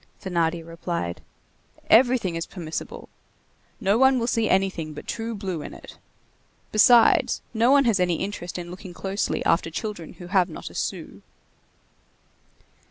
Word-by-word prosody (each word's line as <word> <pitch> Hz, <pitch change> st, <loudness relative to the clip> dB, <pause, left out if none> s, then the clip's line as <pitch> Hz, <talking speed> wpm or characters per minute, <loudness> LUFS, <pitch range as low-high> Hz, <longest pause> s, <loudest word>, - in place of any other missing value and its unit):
Thénardier 170 Hz, -3 st, -1 dB
replied: 165 Hz, -, -4 dB, 0.7 s
"Everything 240 Hz, -5 st, +4 dB
is 165 Hz, 0 st, -4 dB
permissible. 165 Hz, -4 st, -6 dB, 0.7 s
No 200 Hz, +4 st, +2 dB
one 265 Hz, 0 st, +5 dB
will 235 Hz, -, 0 dB
see 230 Hz, -2 st, +1 dB
anything 185 Hz, -5 st, 0 dB
but -, -, -9 dB
true 225 Hz, 0 st, -4 dB
blue 190 Hz, -6 st, -4 dB
in -, -, -8 dB
it. -, -, -13 dB, 0.7 s
Besides, 230 Hz, +2 st, +5 dB
no 230 Hz, +2 st, +3 dB
one 280 Hz, 0 st, +5 dB
has 225 Hz, -5 st, +2 dB
any 180 Hz, -1 st, +2 dB
interest 180 Hz, -2 st, -5 dB
in 175 Hz, -1 st, -6 dB
looking 185 Hz, -1 st, -10 dB
closely 195 Hz, +2 st, -2 dB
after 165 Hz, 0 st, +2 dB
children 175 Hz, -1 st, -6 dB
who 180 Hz, -, -11 dB
have 185 Hz, 0 st, +2 dB
not 160 Hz, -, -8 dB
a -, -, -15 dB
sou." -, -, -5 dB
190 Hz, 145 wpm, -24 LUFS, 170-225 Hz, 0.7 s, one